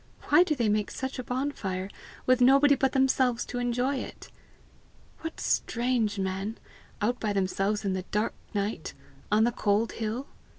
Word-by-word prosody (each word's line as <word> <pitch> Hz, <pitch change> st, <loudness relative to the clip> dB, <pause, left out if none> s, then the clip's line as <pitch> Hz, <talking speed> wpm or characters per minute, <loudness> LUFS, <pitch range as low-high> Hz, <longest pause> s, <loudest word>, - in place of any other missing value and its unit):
"Why -, -, +7 dB
do 330 Hz, -4 st, +2 dB
they 235 Hz, -5 st, +1 dB
make 210 Hz, 0 st, +1 dB
such 265 Hz, 0 st, -4 dB
a -, -, -3 dB
bonfire 240 Hz, -8 st, -2 dB, 0.4 s
with 255 Hz, 0 st, +4 dB
nobody 275 Hz, +3 st, +6 dB
but 270 Hz, -1 st, +1 dB
themselves 260 Hz, -3 st, +2 dB
to 245 Hz, -, -4 dB
enjoy 245 Hz, +3 st, 0 dB
it? -, -, -8 dB, 0.9 s
What 325 Hz, 0 st, -6 dB
strange 235 Hz, -3 st, 0 dB
men 195 Hz, +3 st, -2 dB, 0.5 s
out 245 Hz, +3 st, +1 dB
by 210 Hz, -2 st, -1 dB
themselves 195 Hz, +2 st, 0 dB
in 195 Hz, -, +1 dB
the 185 Hz, -, -1 dB
dark 210 Hz, +2 st, 0 dB, 0.2 s
night, 200 Hz, -4 st, -2 dB, 0.4 s
on 215 Hz, +1 st, +5 dB
the 240 Hz, -, +3 dB
cold 210 Hz, 0 st, +1 dB
hill! 230 Hz, +4 st, -3 dB
235 Hz, 160 wpm, -28 LUFS, 205-260 Hz, 0.9 s, Why